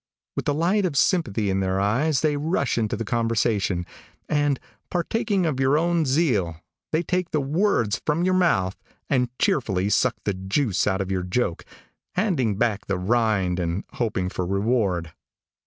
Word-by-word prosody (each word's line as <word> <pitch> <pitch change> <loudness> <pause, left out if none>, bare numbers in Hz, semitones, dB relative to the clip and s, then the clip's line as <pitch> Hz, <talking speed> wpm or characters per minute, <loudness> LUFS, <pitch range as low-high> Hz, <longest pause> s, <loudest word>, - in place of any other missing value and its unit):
With - - -3
the 145 - +1
light 180 +7 +2
of 165 -7 -1
sympathy 110 - +2
in 95 - 0
their 95 0 0
eyes, 130 +9 +1
they 155 -2 +2
rush 145 -1 0
into 110 -3 -1
the 115 - -3
conversation, 110 -5 0 0.4
and, 145 -3 +1 0.3
partaking 195 +1 0
of 150 -5 -1
your 135 +2 +3
own 170 0 +2
zeal, 125 - +1 0.3
they 160 +2 +1
take 180 0 -1
the 155 - 0
words 140 - +1
from 155 +3 0
your 185 +1 +2
mouth, 105 - +2 0.4
and 125 -3 +2
cheerfully 100 -7 +1
suck 125 +1 +2
the 100 - 0
juice 95 +4 0
out 95 -1 +1
of 95 0 -3
your 95 -1 0
joke, 90 0 -1 0.5
handing 150 - +1
back 110 -3 0
the 95 - 0
rind 100 -3 +1
and 85 +2 -2
hoping 95 -6 -1
for 90 - -3
reward. 100 -3 0
115 Hz, 165 wpm, -24 LUFS, 95-155 Hz, 0.5 s, your